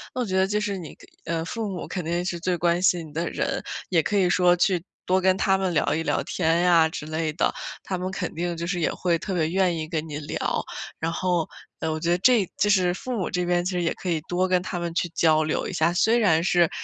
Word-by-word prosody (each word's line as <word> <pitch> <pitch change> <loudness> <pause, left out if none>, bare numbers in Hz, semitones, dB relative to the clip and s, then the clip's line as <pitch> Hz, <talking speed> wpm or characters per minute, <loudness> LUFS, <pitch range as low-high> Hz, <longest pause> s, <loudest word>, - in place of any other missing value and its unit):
那 255 - -1
我 - - 0
觉 190 -3 -3
得 190 0 +3
就 210 +1 0
是 205 -2 -2
你 175 -5 -8
可 - - -17 0.2
呃 165 -1 -2
父 220 +5 -3
母 185 -3 -5
肯 180 - -4
定 170 +2 -1
是 175 -2 -3
最 180 +1 0
关 170 +1 +1
心 175 -3 +2
你 - - -16
的 170 +3 -2
人， - - -2 0.3
也 170 -3 +3
可 205 +6 -1
以 190 -2 +4
说 175 0 +4
去 180 -1 +1 0.2
多 185 +1 +2
跟 185 0 +3
他 195 0 +3
们 190 -2 0
聊 160 - +1
一 160 - 0
聊 - - 0
天 165 -1 +1
呀 170 -3 +5
之 160 -2 -6
类 155 0 -2
的， 155 - +1 0.3
他 190 - -3
们 185 +1 -2
肯 190 -2 -4
定 170 +1 -3
就 170 - -3
是 180 0 -2
也 160 - +1
会 170 -2 0
特 190 +3 -4
别 160 -3 +1
愿 185 -2 +2
意 155 -1 -4
跟 160 -1 -3
你 145 - -4
聊。 145 - -2 0.4
然 165 +1 -1
后， 175 -2 0 0.3
呃， 160 - -1
我 155 - -2
觉 165 +2 -1
得 175 - +3
这 225 -2 +4
就 205 - +2
是 185 -3 +3
父 255 +7 -6
母 190 - -2
这 180 - -1
边 175 0 +1
其 185 - -1
实 180 -1 -1
也 170 - 0
可 - - -8
以 165 -3 0
多 180 +4 0
跟 185 -1 +2
他 180 - -4
们 170 -1 -3
去 175 0 0
交 155 -1 +3
流 155 - -1
一 - - -5
下， 165 -1 +2
虽 220 +6 +3
然 165 -8 +4
是 175 -2 +3
175 Hz, 290 characters per minute, -25 LUFS, 165-185 Hz, 0.4 s, 呀